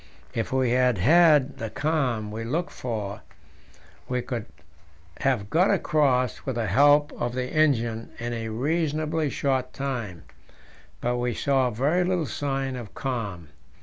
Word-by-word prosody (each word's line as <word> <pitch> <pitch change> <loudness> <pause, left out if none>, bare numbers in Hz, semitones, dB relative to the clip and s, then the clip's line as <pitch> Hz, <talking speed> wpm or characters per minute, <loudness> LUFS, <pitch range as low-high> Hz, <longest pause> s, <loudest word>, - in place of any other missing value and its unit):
If 115 - -2
we 130 -2 +2
had 125 -2 +3
had 150 - +5
the 110 - -3
calms 125 -8 -1
we 115 +1 -4
looked 160 +10 -2
for, 105 -5 -4 0.9
we 125 -1 -1
could 120 -4 -4 0.7
have 120 -7 0
got 180 +5 +4
across 140 - +1
with 130 - -3
the 115 -2 -1
help 145 +8 +4
of 120 0 -1
the 125 0 -3
engine 120 -7 +1
in 120 +1 -4
a 115 -1 -4
reasonably 155 +4 0
short 130 -2 -1
time, 120 - -4 0.8
but 125 +1 0
we 120 -1 -1
saw 135 -2 +2
very 145 +11 +1
little 180 -2 0
sign 135 +1 -2
of 120 -5 -8
calms. 105 - -4
130 Hz, 145 wpm, -26 LUFS, 115-145 Hz, 0.9 s, had